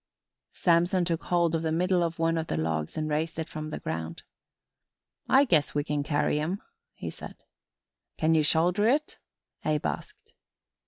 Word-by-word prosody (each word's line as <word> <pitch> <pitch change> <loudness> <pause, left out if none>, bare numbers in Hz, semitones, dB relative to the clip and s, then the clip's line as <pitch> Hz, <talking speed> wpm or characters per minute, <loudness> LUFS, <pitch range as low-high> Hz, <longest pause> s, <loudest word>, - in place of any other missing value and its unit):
Samson 175 +1 +3
took 165 -2 -2
hold 170 -2 +2
of 165 - +1
the 160 -1 -1
middle 180 +2 +2
of 170 -1 -1
one 165 0 +1
of 160 - -4
the - - -2
logs 80 - -2
and 155 0 -1
raised 155 +2 -1
it 160 -1 -3
from 155 -1 -6
the - - -4
ground. 80 0 -5 1.1
"I 270 +2 +6
guess 155 - +2
we 145 - +1
can 150 -1 -1
carry 150 0 +1
'em," 175 +6 -2 0.4
he - - -5
said. - - -10 0.8
"Can 160 +1 +3
ye 160 - +4
shoulder 175 +7 +3
it?" 295 +5 +1 0.4
Abe 150 -1 0
asked. - - -5
160 Hz, 170 wpm, -28 LUFS, 150-175 Hz, 1.1 s, I